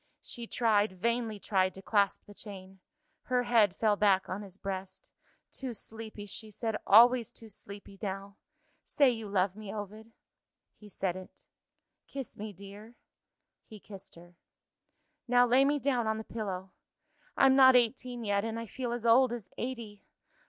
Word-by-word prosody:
She 235 -1 -5
tried, 215 -4 +2
vainly 230 +3 -1
tried, 190 -2 0
to 190 - -10
clasp 200 -2 +1
the 205 - -13
chain. 195 -2 -9 0.4
Her 250 0 0
head 220 -6 +3
fell 215 -2 +2
back 195 -2 +3
on 190 +3 -4
his 195 -2 -11
breast. 190 -1 -6 0.4
"Too 255 -3 -5
sleepy," 220 0 -8
she 215 +2 -7
said; 220 +1 -3
"always 235 +2 +7
too 225 - -12
sleepy 200 -1 -10
now! 195 0 -5 0.5
Say 280 -3 +3
you 225 -3 -6
love 190 -1 +1
me, 215 -2 -8
Ovid." 215 +2 -7 0.6
He 210 - -15
said 190 -2 -2
it. 185 0 -11 0.6
"Kiss 270 -2 -7
me, 215 +1 -6
dear." 200 +4 -12 0.7
He 215 - -11
kissed 195 -1 -9
her. 175 +1 -15 0.9
"Now 245 0 +5
lay 250 +3 +5
me 290 +1 +2
down 260 -5 0
on 220 0 0
the 220 - -5
pillow. 195 -5 -5 0.7
I'm 270 -1 +6
not 260 -1 +8
eighteen 245 0 +1
yet 200 -1 +1
and 225 0 -3
I 230 - -5
feel 240 +2 -4
as 240 -1 -5
old 245 +2 +5
as 235 -5 -6
eighty! 235 -5 -6
215 Hz, 160 wpm, -31 LUFS, 200-235 Hz, 0.9 s, not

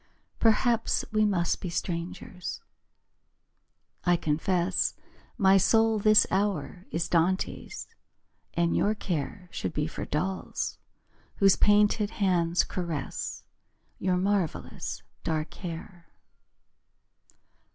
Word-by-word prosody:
Perhaps 225 +1 +2
we 215 0 +3
must 175 -5 +1
be 180 - -3
strangers. 175 +1 -4 1.4
I 175 -1 +4
confess 170 +4 0 0.4
My 195 -3 +6
soul 225 +3 +4
this 215 +1 +6
hour 190 -2 -1
is 165 +1 -1
Dante's, 180 +3 0 0.7
And 170 0 +2
your 210 +1 +2
care 180 -1 -4
Should - - -3
be 150 -1 0
for 160 - -5
dolls 185 +5 -2 0.6
Whose 195 -1 +5
painted 210 0 +4
hands 175 -5 +2
caress 165 -7 -4 0.6
Your 180 -1 +1
marvellous 190 -3 -2 0.2
dark 155 -1 -2
hair. 175 0 -8
185 Hz, 95 wpm, -28 LUFS, 170-205 Hz, 1.4 s, My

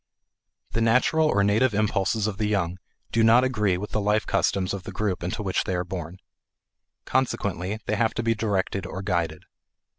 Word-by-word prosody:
The 115 - -1
natural 125 +7 +3
or 100 -9 +2
native 105 +3 +2
impulses 105 0 +1
of 105 -2 -3
the 105 - +1
young 95 -3 -1 0.3
do 115 - +2
not 115 +3 +6
agree 105 -8 +1
with 105 +3 -6
the 105 - 0
life 105 +1 +1
customs 95 -1 0
of 100 - -4
the - - -8
group 100 -4 -2
into 90 +4 -3
which 95 -2 0
they 95 - -1
are 90 - -1
born. 90 -1 -6 0.9
Consequently 105 -6 -1
they - - -1
have 115 -1 +1
to 115 - -1
be 115 0 +2
directed 100 -4 -1
or 95 +1 -6
guided. 85 -5 -1
100 Hz, 185 wpm, -25 LUFS, 95-110 Hz, 0.9 s, not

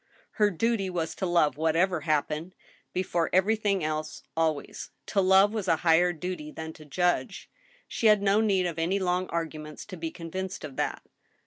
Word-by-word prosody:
Her 210 - +6
duty 205 +1 0
was 165 -3 -2
to 190 - -3
love, 170 -5 +2
whatever 165 +2 +1
happened, 155 +3 -1 0.4
before 175 -2 0
everjrthing 200 0 +2
else, 155 0 -3
always. 160 -3 -1 0.2
To 200 - +1
love 190 +2 +5
was 210 -4 -3
a 165 - +4
higher 175 +2 +5
duty 175 -2 -5
than 160 0 -7
to 155 - -14
judge. 175 +5 -1 0.4
She 225 - +1
had 210 -1 +5
no 200 +2 +4
need 195 -4 +2
of 165 -2 -3
any 175 +4 +1
long 180 -1 0
arguments 155 -2 -5
to 185 - -9
be 165 0 -3
convinced 185 +3 -6
of 145 -4 -7
that. - - -2
175 Hz, 175 wpm, -28 LUFS, 160-190 Hz, 0.4 s, Her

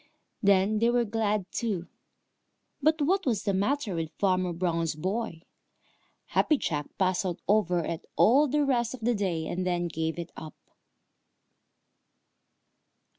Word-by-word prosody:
Then 200 +1 +3
they 230 +2 +3
were 240 0 +2
glad 210 -2 0
too. 200 -8 -2 0.9
But 310 +1 +3
what 380 +6 +2
was 220 -6 +1
the 200 - 0
matter 210 +3 0
with 165 -2 -2
Farmer 185 -2 +1
Brown's 165 -2 -1
boy? 185 +1 -3 0.9
Happy 305 - +3
Jack 150 - -2
puzzled 185 -2 0
over 180 -5 +2
it 165 - -5
all 280 +7 +5
the 295 +2 +1
rest 245 -3 0
of 250 - -15
the 240 +2 +2
day, 185 -7 -1
and 180 +3 -2
then 175 -1 0
gave 160 0 -3
it 170 0 -6
up. 155 -2 -9
195 Hz, 135 wpm, -28 LUFS, 175-235 Hz, 0.9 s, all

